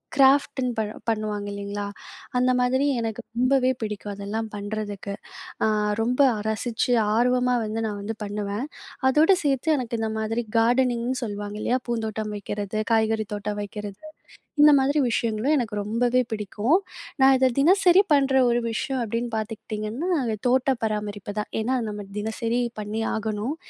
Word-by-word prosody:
கிராஃப்ட்டுன்னு 270 Hz, -2 st, +4 dB
பண் 215 Hz, -1 st, -1 dB, 0.2 s
பண்ணுவாங்க 215 Hz, -2 st, -2 dB
இல்லைங்களா? 200 Hz, 0 st, -4 dB, 0.5 s
அந்த 250 Hz, +1 st, +3 dB
மாதிரி 260 Hz, +3 st, +2 dB, 0.2 s
எனக்கு 225 Hz, -1 st, -3 dB, 0.2 s
ரொம்பவே 255 Hz, +1 st, +3 dB
பிடிக்கும், 210 Hz, -1 st, -4 dB
அதெல்லாம் 215 Hz, +2 st, -4 dB
பண்றதுக்கு. 205 Hz, -1 st, -4 dB, 0.5 s
அ -, -, +3 dB, 0.3 s
ரொம்ப 245 Hz, +3 st, 0 dB, 0.2 s
அ -, -, -4 dB
ரசிச்சு 235 Hz, +2 st, 0 dB, 0.2 s
ஆர்வமா 250 Hz, +1 st, +3 dB
வந்து 220 Hz, +1 st, -3 dB
நான் 205 Hz, -1 st, -4 dB
வந்து 220 Hz, +2 st, -4 dB
பண்ணுவேன். 205 Hz, +5 st, -3 dB, 0.4 s
அதோடு 315 Hz, +8 st, +5 dB
சேர்த்து 285 Hz, +3 st, +2 dB
எனக்கு 235 Hz, -2 st, -3 dB
இந்த 220 Hz, -1 st, -1 dB
மாதிரி 225 Hz, +2 st, -1 dB, 0.2 s
கார்டனிங்னு 245 Hz, +1 st, +1 dB
சொல்லுவாங்க, 205 Hz, -1 st, -5 dB
இல்லையா? 250 Hz, +2 st, +1 dB
பூந்தோட்டம் 220 Hz, -2 st, -2 dB
வைக்கிறது, 205 Hz, 0 st, -4 dB, 0.2 s
காய்கறி 220 Hz, -1 st, +2 dB
தோட்டம் 205 Hz, 0 st, -3 dB
வைக்கிறது, 205 Hz, -1 st, -7 dB, 0.6 s
இந்த 300 Hz, 0 st, +9 dB
மாதிரி 280 Hz, +3 st, +2 dB
விஷயங்களும் 230 Hz, +4 st, 0 dB
எனக்கு 230 Hz, -5 st, -2 dB
ரொம்பவே 240 Hz, +4 st, +2 dB
பிடிக்கும். 215 Hz, -, +1 dB, 0.4 s
நான் 265 Hz, 0 st, +7 dB
இத 260 Hz, -, +3 dB
தினசரி 365 Hz, +4 st, +6 dB
பண்ற 275 Hz, -2 st, +4 dB, 0.2 s
ஒரு 240 Hz, 0 st, +2 dB
விஷயம் 260 Hz, +4 st, -2 dB
அப்படின்னு 230 Hz, +2 st, -2 dB
பார்த்துக்கிட்டீங்கன்னா, 220 Hz, -, -4 dB, 0.4 s
தோட்ட 260 Hz, +2 st, +3 dB
பராமரிப்பு 210 Hz, -2 st, -3 dB
தான். 210 Hz, -, -4 dB
ஏன்னா 245 Hz, +4 st, 0 dB
அது 235 Hz, -, -3 dB
நம்ம 210 Hz, 0 st, -5 dB
தினசரி 225 Hz, +3 st, -1 dB, 0.2 s
பண்ணி 210 Hz, +1 st, -3 dB
ஆகணும். 220 Hz, +5 st, -2 dB
225 Hz, 140 wpm, -25 LUFS, 210-255 Hz, 0.6 s, இந்த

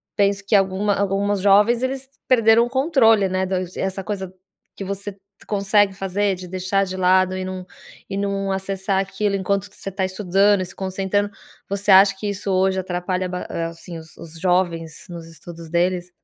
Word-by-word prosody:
penso 200 Hz, -1 st, +1 dB
que 210 Hz, -, +2 dB
alguma 195 Hz, +1 st, +2 dB
alguns 200 Hz, +1 st, 0 dB
jovens 210 Hz, +5 st, +4 dB
eles 265 Hz, 0 st, -3 dB, 0.2 s
perderam 230 Hz, -2 st, +5 dB
o -, -, -6 dB
controle, 260 Hz, -, +3 dB
né, 185 Hz, 0 st, 0 dB
do 190 Hz, 0 st, -2 dB, 0.2 s
essa 190 Hz, 0 st, -2 dB
coisa 190 Hz, -2 st, -5 dB, 0.4 s
que -, -, -6 dB
você 200 Hz, +1 st, -5 dB, 0.3 s
consegue 205 Hz, 0 st, +2 dB
fazer 195 Hz, +1 st, 0 dB
de 180 Hz, 0 st, -9 dB
deixar 185 Hz, +2 st, 0 dB
de 185 Hz, 0 st, -6 dB
lado 185 Hz, 0 st, +3 dB
e 185 Hz, -, -3 dB
num 185 Hz, -1 st, -6 dB, 0.4 s
e -, -, -4 dB
num 200 Hz, -1 st, -1 dB
acessar 190 Hz, 0 st, -1 dB
aquilo 195 Hz, +1 st, -1 dB
enquanto 195 Hz, +1 st, -1 dB
que 200 Hz, -, -17 dB
você -, -, -6 dB
está 190 Hz, 0 st, -2 dB
estudando 195 Hz, +1 st, +2 dB
e -, -, -2 dB
se 175 Hz, -, -11 dB
concentrando. 195 Hz, +2 st, -1 dB, 0.4 s
Você 200 Hz, +1 st, -2 dB
acha 195 Hz, +1 st, +7 dB
que 205 Hz, +1 st, -3 dB
isso 200 Hz, 0 st, -3 dB
hoje 190 Hz, 0 st, +2 dB
atrapalha 180 Hz, 0 st, -2 dB
ba 180 Hz, 0 st, -4 dB, 0.2 s
assim, 165 Hz, +1 st, -10 dB
os 160 Hz, -1 st, -12 dB
os 165 Hz, 0 st, -10 dB
jovens 175 Hz, -3 st, -1 dB
nos 170 Hz, -2 st, -8 dB
estudos 165 Hz, 0 st, -11 dB
deles? 175 Hz, +1 st, 0 dB
195 Hz, 180 wpm, -21 LUFS, 185-200 Hz, 0.4 s, acha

